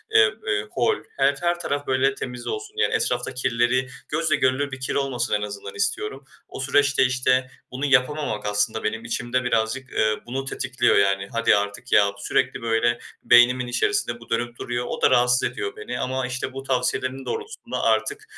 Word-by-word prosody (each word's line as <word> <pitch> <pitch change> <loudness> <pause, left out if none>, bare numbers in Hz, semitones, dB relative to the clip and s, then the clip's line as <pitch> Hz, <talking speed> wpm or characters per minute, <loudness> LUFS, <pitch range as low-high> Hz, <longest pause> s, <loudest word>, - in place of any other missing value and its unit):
eee, 110 -1 +6
eee, 105 0 0
hol 120 - +2 0.2
her 140 +1 +3
her 175 0 +1
taraf 145 -4 -3
böyle 135 +1 +2
temiz 125 -2 -6
olsun. 425 0 -4
Yani 445 - +2
etrafta - - 0
kirleri, 125 0 +1 0.2
gözle 155 0 +1
görülür 130 +2 +1
bir 130 - -6
kir 130 - -3
olmasın 135 -3 -1
en 105 - +1
azından 100 -1 -6
istiyorum. 105 +6 -2 0.2
O - - -9
süreçte 140 +2 +3
işte, 130 0 +1 0.2
bunu 135 +3 -3
yapamamak 135 -4 +1
aslında 105 +2 0
benim 110 +1 -2
içimde 120 +2 -1
birazcık, 125 +2 -1
eee, 110 0 +2
bunu 135 +3 -4
tetikliyor 130 -1 +1
yani. 100 0 +2
"Hadi 115 -2 +3
artık 105 +4 -3
ya!" 100 -1 +5
sürekli 125 +5 0
böyle 115 +1 +1 0.2
beynimin 125 +1 +5
içerisinde 120 0 0
bu 120 - -15
dönüp 120 +1 -2
duruyor. 120 0 -3
O - - -5
da - - +5
rahatsız 125 0 +4
ediyor 410 -1 -4
beni 435 - -5
ama 130 0 -1
işte, 125 +1 -4
bu 135 0 -6
tavsiyelerin 130 0 -1
doğrultusunda 445 0 -5
artık, 420 +1 +1
125 Hz, 175 wpm, -24 LUFS, 115-135 Hz, 0.2 s, eee